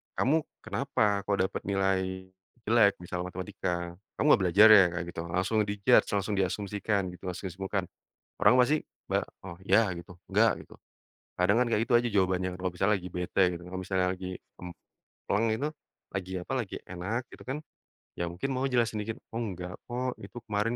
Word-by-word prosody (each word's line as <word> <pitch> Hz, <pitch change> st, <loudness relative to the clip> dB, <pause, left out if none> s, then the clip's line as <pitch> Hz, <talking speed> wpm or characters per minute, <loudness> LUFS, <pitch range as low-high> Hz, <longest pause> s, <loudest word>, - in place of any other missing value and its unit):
"Kamu 140 Hz, +5 st, +3 dB, 0.3 s
kenapa 135 Hz, -5 st, -1 dB, 0.2 s
kok 100 Hz, -, +2 dB
dapat 95 Hz, +1 st, -1 dB
nilai 95 Hz, -1 st, +2 dB, 0.7 s
jelek?" 110 Hz, -3 st, +5 dB
Misalnya 90 Hz, 0 st, -4 dB
matematika, 95 Hz, 0 st, -3 dB, 0.5 s
"Kamu -, -, +1 dB
gak -, -, -5 dB
belajar 100 Hz, +6 st, +8 dB
ya?" 105 Hz, -3 st, +10 dB
Kayak 90 Hz, 0 st, -3 dB
gitu 85 Hz, -, -5 dB
langsung 95 Hz, +6 st, 0 dB
di 100 Hz, -, -2 dB
judge -, -, +5 dB
langsung 100 Hz, +1 st, 0 dB
diasumsikan 100 Hz, +1 st, 0 dB
gitu 90 Hz, -, -15 dB
langsung 90 Hz, +2 st, -5 dB
asismukan 95 Hz, +2 st, -3 dB, 0.6 s
orang -, -, +7 dB
pasti 150 Hz, +5 st, +2 dB, 0.3 s
ba -, -, +2 dB, 0.2 s
oh 95 Hz, -, -6 dB
ya 115 Hz, -, +5 dB
gitu, 85 Hz, +1 st, -11 dB
nggak 110 Hz, +3 st, +5 dB
gitu, -, -, -15 dB, 0.6 s
kadang 95 Hz, +5 st, +4 dB
kan 125 Hz, -, +3 dB
kayak 110 Hz, -, +2 dB
gitu -, -, 0 dB
aja 120 Hz, 0 st, +1 dB
jawabannya, 95 Hz, -2 st, +2 dB
kalau 95 Hz, -, 0 dB
misalnya 95 Hz, +4 st, +2 dB
lagi 90 Hz, 0 st, -8 dB
bete 90 Hz, +2 st, -1 dB, 0.2 s
gitu, -, -, -15 dB
kalau 95 Hz, +1 st, -5 dB
misalnya 95 Hz, 0 st, 0 dB
lagi 95 Hz, 0 st, -6 dB, 1.0 s
pleng 105 Hz, +3 st, +3 dB
itu 140 Hz, +6 st, -1 dB, 0.5 s
lagi 95 Hz, -1 st, -4 dB
apa, -, -, -5 dB
lagi 105 Hz, -6 st, -4 dB
enak 95 Hz, +6 st, -3 dB
gitu -, -, -12 dB
kan, 135 Hz, -, -1 dB, 0.6 s
ya 85 Hz, -, 0 dB
mungkin 90 Hz, +11 st, -3 dB
mau 130 Hz, +1 st, 0 dB
jelasin 120 Hz, -4 st, +1 dB
dikit. 110 Hz, +1 st, -4 dB, 0.2 s
"Oh 115 Hz, -, -2 dB
enggak 90 Hz, -3 st, -5 dB
kok, 125 Hz, +1 st, -2 dB
itu -, -, -10 dB
kemarin 105 Hz, +3 st, 0 dB
100 Hz, 180 wpm, -29 LUFS, 90-115 Hz, 1.0 s, ya